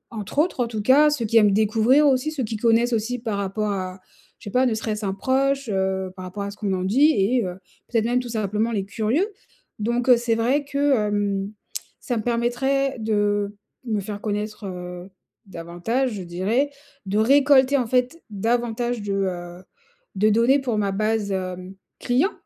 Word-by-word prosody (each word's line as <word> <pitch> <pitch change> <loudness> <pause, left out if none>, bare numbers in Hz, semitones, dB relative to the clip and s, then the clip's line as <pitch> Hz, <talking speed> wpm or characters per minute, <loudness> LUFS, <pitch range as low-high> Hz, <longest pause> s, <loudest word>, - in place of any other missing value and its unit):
entre 210 +4 -7
autres 320 -2 +1
en - - -6
tout 220 -2 -4
cas. 285 +6 +6
Ceux 290 -6 -1
qui 230 +2 +2
aiment 210 -2 +6
découvrir 220 +7 +3
aussi, 270 +2 +2
ceux 290 -4 -3
qui 220 -1 -3
connaissent 235 +2 +2
aussi 230 +3 -1
par 220 -3 -3
rapport 205 +2 -2
à, 185 -1 -4 0.4
je - - -19
sais 205 - -6
pas, 255 +4 +3
ne 235 - +1
serait-ce 215 -1 -3
un 190 - -1
proche, 270 +5 0
heu, 190 -1 -1
par 185 - -8
rapport 195 +3 -5
à 200 - -4
ce 205 - -13
qu'on 205 -3 -2
en 185 -1 -1
dit 265 +11 +4
et 230 +5 +2
heu, 180 -1 -5 0.3
peut-être 225 -2 0
même 245 +2 +2
tout 250 -1 -6
simplement 215 0 -1
les 200 -4 -1
curieux. 225 - 0 0.5
Donc, 240 +4 -1
heu, 250 - +8
c'est 235 -1 0
vrai 255 +6 +1
que, 280 0 +1
hem, 205 -1 -1 0.5
ça 245 -3 -3
me - - -1
permettrait 245 +4 0
de 205 -2 0 0.3
me 220 -3 -1
faire 205 +1 -6
connaître, 210 0 -4
heu, 180 0 -7 0.4
davantage 190 +9 -2
je 200 - -5
dirais, 195 +11 0 0.4
de 200 +2 -1
récolter 275 +2 +5
en 250 -3 -1
fait 255 +7 0
davantage 235 +2 -1
de, 205 -1 -3
heu, 180 -2 -3 0.5
de 210 +3 +3
données 235 +6 +4
pour 245 -5 -2
ma 200 -2 0
base, 215 0 0
heu, 185 0 -5 0.2
client, 265 - +1
220 Hz, 190 wpm, -23 LUFS, 200-250 Hz, 0.5 s, heu